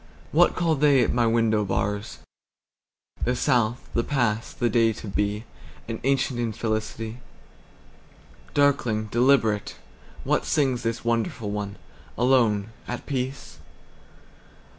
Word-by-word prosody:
What -, -, +4 dB
call 170 Hz, -3 st, +1 dB
they 140 Hz, -3 st, +4 dB
at -, -, 0 dB
my 120 Hz, -1 st, +2 dB
window 115 Hz, -2 st, +2 dB
bars? 105 Hz, +1 st, -2 dB, 1.1 s
The 125 Hz, -, +1 dB
South, 125 Hz, -3 st, +1 dB
the 115 Hz, -, +1 dB
past, 115 Hz, -6 st, -1 dB
the 120 Hz, -, +2 dB
day 115 Hz, 0 st, +3 dB
to 110 Hz, -, -9 dB
be, 105 Hz, +2 st, -1 dB, 0.4 s
An 115 Hz, -1 st, -4 dB
ancient 135 Hz, -2 st, +1 dB
infelicity. 110 Hz, 0 st, -3 dB, 1.4 s
Darkling, 120 Hz, -7 st, +2 dB
deliberate, 120 Hz, -4 st, +2 dB, 0.5 s
what -, -, +1 dB
singsThis 120 Hz, -5 st, 0 dB
wonderful 115 Hz, -2 st, -1 dB
one, 105 Hz, -1 st, -4 dB, 0.4 s
alone, 115 Hz, -4 st, +2 dB, 0.2 s
at 125 Hz, -, -5 dB
peace? 130 Hz, -1 st, -4 dB
115 Hz, 110 wpm, -25 LUFS, 110-130 Hz, 1.4 s, What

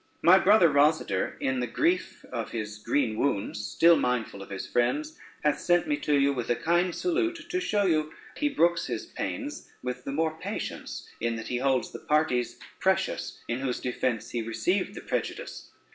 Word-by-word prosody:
My 185 Hz, +3 st, +8 dB
brother 200 Hz, -3 st, +6 dB
Rosader, 145 Hz, -, +2 dB
in 130 Hz, -1 st, 0 dB
the 125 Hz, -, -1 dB
grief 180 Hz, +10 st, 0 dB
of 115 Hz, -3 st, -3 dB
his 105 Hz, -2 st, -5 dB
green 115 Hz, -1 st, 0 dB
wounds 105 Hz, -5 st, -1 dB
still 170 Hz, +8 st, +5 dB
mindful 125 Hz, -7 st, -1 dB
of 100 Hz, -, -10 dB
his 95 Hz, -1 st, -5 dB
friends, 300 Hz, -, 0 dB, 0.3 s
hath 150 Hz, -, +2 dB
sent 175 Hz, +5 st, +2 dB
me 295 Hz, -, +2 dB
to 150 Hz, -, +1 dB
you 140 Hz, 0 st, +3 dB
with 125 Hz, -3 st, -4 dB
a 120 Hz, -, +3 dB
kind 175 Hz, +4 st, +1 dB
salute, 340 Hz, -1 st, -1 dB
to 365 Hz, -, +1 dB
show 205 Hz, -, +1 dB
that 155 Hz, -2 st, +1 dB, 0.2 s
he 295 Hz, -, +1 dB
brooks 170 Hz, -11 st, +2 dB
his -, -, -3 dB
pains 290 Hz, +1 st, -5 dB
with 125 Hz, 0 st, -4 dB
the 140 Hz, -, -4 dB
more 160 Hz, +2 st, 0 dB
patience, -, -, -5 dB
in 115 Hz, 0 st, 0 dB
that 115 Hz, -, -6 dB
he 125 Hz, -, 0 dB
holds 130 Hz, 0 st, +1 dB
the -, -, -7 dB
parties 150 Hz, -5 st, +1 dB, 0.2 s
precious -, -, 0 dB
in 120 Hz, +1 st, -2 dB
whose 130 Hz, -2 st, -2 dB
defence 120 Hz, -2 st, -2 dB
he 120 Hz, -, -1 dB
received 175 Hz, -, -1 dB
the -, -, -6 dB
prejudice. -, -, -4 dB
140 Hz, 185 wpm, -28 LUFS, 120-175 Hz, 0.3 s, My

